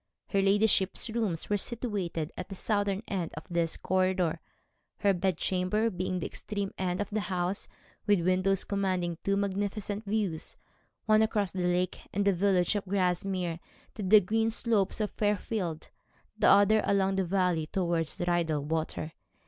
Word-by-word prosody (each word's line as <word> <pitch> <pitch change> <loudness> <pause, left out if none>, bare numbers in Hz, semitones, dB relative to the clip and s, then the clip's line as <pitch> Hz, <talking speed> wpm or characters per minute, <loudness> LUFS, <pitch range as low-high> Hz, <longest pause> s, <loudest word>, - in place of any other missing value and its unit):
Her 195 - +2
ladyship's 200 +1 +3
rooms 215 -8 -2
were 205 - +1
situated 195 -9 -3
at 185 - -7
the 195 - -6
southern 205 0 0
end 180 -5 -3
of 155 - -7
this 170 -1 0
corridor, 185 -3 +1 0.6
her 200 -1 +4
bed 185 -1 0
chamber 190 +6 0
being 185 0 -3
at 180 - -2
the - - -3
extreme 200 -2 -4
end 180 -1 -2
of 205 - -3
the 215 - 0
house, 185 -1 -1 0.4
with 205 -4 +4
windows 185 +1 +2
commanding 185 -4 -1
two 200 0 +1
magnificent 200 +1 -2
views, 200 -6 -1 0.5
one 215 0 +5
across 210 -3 +1
the 180 -2 -1
lake 180 0 0
and 200 +1 0
the 200 - +4
village 185 +1 +2
of 205 - -2
Grasmere 180 -2 -1 0.3
to 220 - -7
the 205 +2 +6
green 225 +4 +1
slopes 220 -3 0
of 210 - -1
Fairfield, 205 -5 -2 0.4
the - - +2
other 205 +2 +6
along 195 -1 +1
the 190 - +2
valley 180 -3 0
towards 170 -3 -1
Rydal 170 -4 0
Water. 160 +1 -3
190 Hz, 160 wpm, -29 LUFS, 175-205 Hz, 0.6 s, the